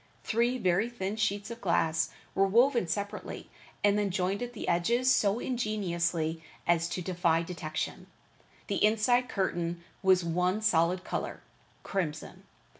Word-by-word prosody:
Three 235 +3 +1
very 200 +1 +1
thin 210 -4 -3
sheets 205 0 -1
of 235 - -8
glass 165 -3 +1 0.2
were 195 0 +3
woven 235 0 +4
separately 200 +5 -4 0.3
and 205 0 +4
then 205 -1 +1
joined 190 +2 -1
at 245 0 -4
the 220 - -6
edges 235 +10 +2
so 205 -2 +2
ingeniously 170 -10 -1 0.2
as 170 -1 +2
to 180 - -3
defy 170 -2 +1
detection. 155 -3 -4 0.6
The - - -1
inside 235 +4 +3
curtain 175 -3 -2 0.2
was 190 -2 +4
one 180 +5 0
solid 180 -2 +2
color: - - -4 0.4
crimson. 165 -6 -4
190 Hz, 135 wpm, -30 LUFS, 170-215 Hz, 0.6 s, woven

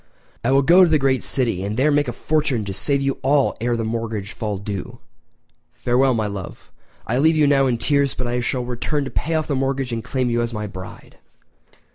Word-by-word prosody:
I 120 - +1
will 135 +1 +4
go 175 +6 +7
to 175 - +4
the 155 - +4
great 135 -2 +1
city 115 -8 -1
and 105 +3 -3
there 145 +4 +3
make 145 -1 +2
a - - -1
fortune 135 -4 0
to 100 - -4
save 140 +7 0
you 135 0 -1
all 140 +1 +2
ere 120 0 0
the 115 - -2
mortgage 110 -2 -3
fall 105 -3 -3
due! 100 +4 -6 0.8
Farewell, 125 +1 +2
my 110 -1 0
love—I 100 +4 -6
leave 160 +2 +4
you 150 - +4
now 140 -1 +4
in 120 -2 +1
tears, 140 +3 +1
but 125 - -3
I 120 +1 -1
shall 125 +1 -2
return 130 +4 -2
to - - -6
pay 165 +1 -1
off 155 -1 0
the 145 - -2
mortgage 135 -1 -1
and 115 -1 -3
claim 130 -1 -1
you 120 0 +1
as 120 -1 -3
my 105 0 -3
bride!" 95 -2 -10
125 Hz, 220 wpm, -21 LUFS, 115-140 Hz, 0.8 s, go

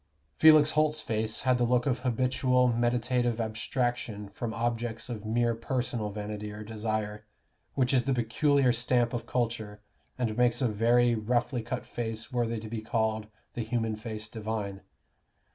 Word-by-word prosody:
Felix 155 - +7
Holt's 155 0 +2
face 110 -5 -1
had 130 -1 +2
the - - +3
look 120 0 +2
of 135 -3 +1
habitual 125 0 +2
meditative 120 0 +1
abstraction 115 -1 -2
from 110 +3 -4
objects 115 0 -2
of 110 -3 -5
mere 120 +1 +2
personal 115 -2 -2
vanity 105 0 -5
or 105 +1 -7
desire, 110 -1 -3 0.5
which 130 -1 +2
is 125 -2 +3
the 135 - +2
peculiar 130 +3 +3
stamp 120 0 +1
of 120 - -4
culture, 110 -4 -2 0.4
and 115 -4 -1
makes 120 0 +3
a 130 - +2
very 120 +3 +3
roughly 120 +2 0
cut 120 +2 -4
face 115 +1 -5
worthy 115 -2 0
to 110 - -8
be 110 0 -4
called 110 -1 -1 0.3
"the 120 - -3
human 115 -1 -1
face 110 -1 -6
divine." 105 -3 -4
115 Hz, 155 wpm, -29 LUFS, 110-125 Hz, 0.5 s, Felix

